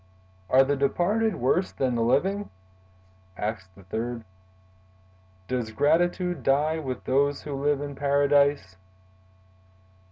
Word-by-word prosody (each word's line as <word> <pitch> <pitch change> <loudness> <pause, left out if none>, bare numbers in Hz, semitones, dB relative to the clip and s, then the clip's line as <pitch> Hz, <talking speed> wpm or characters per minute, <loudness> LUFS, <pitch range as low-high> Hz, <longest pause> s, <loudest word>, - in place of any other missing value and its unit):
"Are 130 +1 +6
the 140 +1 0
departed 195 +10 +1
worse 150 +10 0
than 130 -2 -1
the 115 - -1
living?" 190 - +1 0.9
asked 95 -4 -5
the 100 - -16
third. 115 +5 -4 1.2
"Does 125 -2 -2
gratitude 175 - +1
die 150 +5 +1
with 130 -4 -5
those 140 +2 +1
who 145 - -6
live 140 +1 0
in 145 -1 -5
Paradise?" 140 -7 +2
140 Hz, 115 wpm, -26 LUFS, 120-150 Hz, 1.2 s, Are